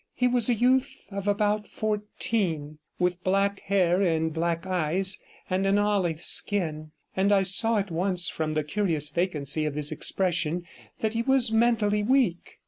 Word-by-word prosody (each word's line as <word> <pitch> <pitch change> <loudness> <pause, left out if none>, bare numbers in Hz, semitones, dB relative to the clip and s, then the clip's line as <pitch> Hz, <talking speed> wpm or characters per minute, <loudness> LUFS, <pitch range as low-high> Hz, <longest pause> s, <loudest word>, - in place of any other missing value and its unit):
He 250 - +2
was 245 -1 +2
a 240 - +3
youth 255 +4 +1
of 200 0 -5
about 210 0 0
fourteen, 205 -7 -2 0.2
with 180 0 -1
black 195 +1 +1
hair 185 -2 +1
and 160 -3 0
black 165 +1 -2
eyes 185 +2 0 0.3
and 190 +1 0
an 195 +1 +3
olive 195 -6 0
skin, 155 -7 +1 0.3
and 195 +2 +2
I 195 -1 +4
saw 225 +4 +3
at 200 -2 -2
once 180 +1 +1
from 155 -1 -3
the 155 0 0
curious 155 -3 -1
vacancy 155 -4 0
of 145 - -4
his 150 -1 0
expression 175 -2 -1 0.4
that 220 0 -1
he 230 - 0
was 260 -2 +2
mentally 220 -2 +2
weak. 230 -6 0
190 Hz, 160 wpm, -26 LUFS, 165-210 Hz, 0.4 s, I